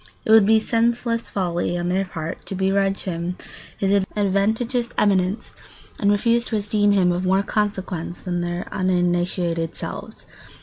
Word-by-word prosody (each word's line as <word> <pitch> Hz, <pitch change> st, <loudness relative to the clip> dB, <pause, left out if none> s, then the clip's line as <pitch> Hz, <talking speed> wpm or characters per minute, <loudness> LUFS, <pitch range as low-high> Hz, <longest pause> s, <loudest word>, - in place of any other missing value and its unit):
It -, -, +1 dB
would 220 Hz, -3 st, +7 dB
be 220 Hz, +1 st, +6 dB
senseless 230 Hz, +1 st, 0 dB
folly 175 Hz, -2 st, -1 dB
on 175 Hz, 0 st, -2 dB
their 190 Hz, +2 st, +1 dB
part 165 Hz, -2 st, -6 dB
to 195 Hz, -, -4 dB
begrudge 195 Hz, +1 st, +1 dB
him 175 Hz, 0 st, -3 dB, 0.4 s
his 195 Hz, 0 st, +1 dB, 0.2 s
adventitious 220 Hz, +5 st, 0 dB
eminence 195 Hz, 0 st, +1 dB, 0.5 s
and 200 Hz, -, +2 dB
refuse 230 Hz, +3 st, +2 dB
to 225 Hz, -, -3 dB
esteem 205 Hz, 0 st, +2 dB
him 185 Hz, -3 st, +3 dB
of 175 Hz, +1 st, -1 dB
more 190 Hz, +1 st, +3 dB
consequence 190 Hz, -5 st, -2 dB
than 175 Hz, -2 st, -2 dB
their 175 Hz, 0 st, -3 dB
uninitiated 175 Hz, -2 st, 0 dB
selves. -, -, -7 dB
195 Hz, 145 wpm, -22 LUFS, 175-210 Hz, 0.5 s, would